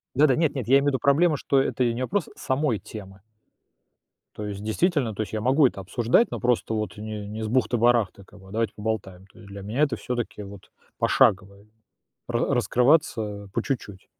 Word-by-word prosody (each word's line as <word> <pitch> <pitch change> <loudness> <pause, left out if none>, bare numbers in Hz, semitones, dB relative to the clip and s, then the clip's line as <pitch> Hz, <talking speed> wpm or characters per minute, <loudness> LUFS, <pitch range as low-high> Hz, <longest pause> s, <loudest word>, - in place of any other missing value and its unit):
Да-да, 140 -1 +4
нет-нет, 145 -7 -1
я 135 - +5
имею 140 - -2
в - - +1
виду, 130 - -1
проблема- 150 +2 +3
что 135 - +1
это 130 -1 0
не 125 - -4
вопрос 175 +7 -1
самой 130 -5 -1
темы. 95 -3 -11 1.1
То 105 - -5
есть, 100 0 -6
действительно, 130 - 0
то 110 +2 -2
есть - - -10
я 110 - -2
могу 135 +4 +4
это 100 - -6
обсуждать, 120 - +2
но - - -4
просто 120 -2 0
вот 110 -1 -3
не 105 -1 -6
не 110 +2 -5
с - - -2
бухты-барахты, 120 -4 +1
как 105 +2 -18
бы, 95 - -16
"А - - -13
давайте 110 -1 -1
поболтаем". 105 -4 -4
То - - -20
есть 100 - -14
для 100 0 -8
меня 110 +9 -3
это, 140 -6 +2
всё-таки, 120 -4 -4
вот 100 -1 -12 0.3
пошагово, 100 +1 +2 0.6
ра - - 0
раскрываться 115 -7 +1
по 115 - 0
чуть-чуть. 105 -8 -5
110 Hz, 195 wpm, -25 LUFS, 105-135 Hz, 1.1 s, я